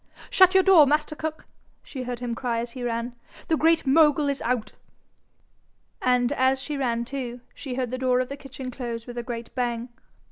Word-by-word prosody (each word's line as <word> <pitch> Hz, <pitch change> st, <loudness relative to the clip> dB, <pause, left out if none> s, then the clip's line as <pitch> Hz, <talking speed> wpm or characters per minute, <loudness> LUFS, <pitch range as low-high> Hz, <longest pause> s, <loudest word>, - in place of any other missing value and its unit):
'Shut 375 Hz, 0 st, +6 dB
your 380 Hz, -, +6 dB
door, 355 Hz, -7 st, +7 dB
master 300 Hz, +2 st, +1 dB
cook,' 315 Hz, 0 st, -5 dB, 0.4 s
she 265 Hz, -, -7 dB
heard 250 Hz, -1 st, -4 dB
him 240 Hz, 0 st, -4 dB
cry 235 Hz, 0 st, -2 dB
as 235 Hz, +1 st, -3 dB
he 255 Hz, -, -8 dB
ran. 235 Hz, 0 st, -2 dB, 0.4 s
'The 320 Hz, -, +3 dB
Great 325 Hz, +1 st, +3 dB
Mogul 295 Hz, 0 st, +4 dB
is 280 Hz, -1 st, -2 dB
out.' 230 Hz, -3 st, -1 dB, 1.3 s
And 250 Hz, 0 st, +2 dB
as 260 Hz, -1 st, +2 dB
she 295 Hz, +2 st, -5 dB
ran 235 Hz, -4 st, -1 dB
too, 250 Hz, -2 st, -5 dB
she 260 Hz, -4 st, -6 dB
heard 250 Hz, -2 st, -2 dB
the 255 Hz, -, -3 dB
door 255 Hz, -1 st, +2 dB
of 255 Hz, -, 0 dB
the 280 Hz, -, -6 dB
kitchen 270 Hz, -2 st, -8 dB
close 235 Hz, -2 st, -5 dB
with 245 Hz, -1 st, -6 dB
a -, -, -1 dB
great 235 Hz, -1 st, -6 dB
bang. 240 Hz, -1 st, -2 dB
255 Hz, 200 wpm, -25 LUFS, 240-285 Hz, 1.3 s, door